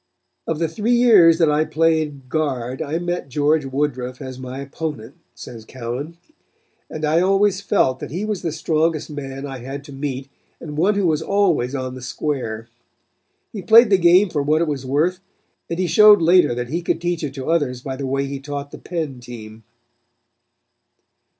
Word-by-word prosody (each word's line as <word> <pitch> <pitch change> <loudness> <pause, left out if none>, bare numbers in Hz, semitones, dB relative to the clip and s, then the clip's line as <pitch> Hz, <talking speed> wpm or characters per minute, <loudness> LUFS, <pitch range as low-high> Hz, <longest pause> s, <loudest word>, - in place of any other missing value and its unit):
"Of 165 - -1
the 165 +1 0
three 215 +9 0
years 205 -9 +6
that 165 -3 +3
I 150 +1 +2
played 155 -4 0
guard 130 -4 -2
I 160 +1 -2
met 175 -4 -3
George 150 +2 +1
Woodruff 130 -2 -3
as 130 -2 -8
my 130 0 -7
opponent," 140 -4 -6 0.2
says 115 -3 -10
Cowan, 130 +7 -6 0.7
"and 155 0 -4
I 155 +2 +2
always 195 +1 +2
felt 130 -9 +1
that - - -7
he 180 +8 -3
was 210 -4 -3
the 165 - -2
strongest 160 0 -1
man 135 -1 -6
I 135 -2 -7
had 135 +3 -7
to 140 -1 -12
meet 135 -1 -4 0.3
and 150 -3 -8
one 190 +7 +2
who 200 -2 +1
was 160 -2 +1
always 170 -9 +1
on 130 -1 -4
the 130 - -9
square. 125 -4 -4 0.9
He 205 - -5
played 225 +4 +6
the 195 - +5
game 180 +2 +5
for 150 - 0
what 150 +2 +2
it - - -2
was 135 -3 -4
worth, 160 +7 +1 0.5
and 170 - -3
he 185 - 0
showed 210 +4 +7
later 170 -6 +4
that 120 0 -4
he 170 +5 -2
could 170 - -1
teach 175 -1 -2
it 140 -2 -4
to 135 +3 -3
others 130 -7 0
by 135 -1 -4
the 135 0 -4
way 135 +1 -1
he 140 0 -5
taught 140 0 -6
the - - -10
Penn' 155 -7 -4
team." 110 -2 -11
150 Hz, 190 wpm, -21 LUFS, 130-170 Hz, 0.9 s, showed